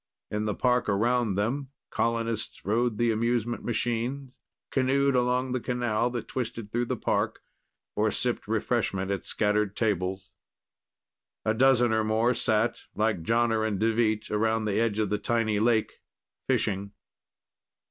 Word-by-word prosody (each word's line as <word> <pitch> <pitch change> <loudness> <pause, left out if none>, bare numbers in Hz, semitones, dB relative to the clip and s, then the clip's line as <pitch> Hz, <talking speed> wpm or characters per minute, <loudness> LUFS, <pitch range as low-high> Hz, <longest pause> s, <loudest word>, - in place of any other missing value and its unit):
In 105 +1 -1
the 105 -2 -1
park 125 -3 +1
around 115 +1 +1
them, 125 +7 -1 0.2
colonists 115 -1 -2
rode 115 +2 +1
the 120 0 +2
amusement 120 +1 0
machines, 120 +3 -2 0.4
canoed 135 +1 +2
along 125 +1 +1
the 130 - 0
canal 120 -2 0
that 120 -2 -5
twisted 115 -4 -4
through 120 +1 0
the - - -2
park - - -1 0.5
or - - +2
sipped - - -1
refreshment 95 0 0
at 100 - -3
scattered 105 -1 0
tables. 95 -3 -1 1.1
A 110 - +2
dozen 120 -1 +4
or 110 0 +2
more 110 +3 +2
sat, 110 -1 +1 0.2
like 105 -4 +1
Jonner 115 +3 +2
and 105 -3 -1
Deveet, 110 -1 +1
around 110 +1 +1
the 105 0 0
edge 115 -3 0
of 105 -2 0
the 105 - 0
tiny 110 -3 0
lake, 110 0 +1 0.5
fishing. 100 0 0
115 Hz, 140 wpm, -27 LUFS, 105-120 Hz, 1.1 s, dozen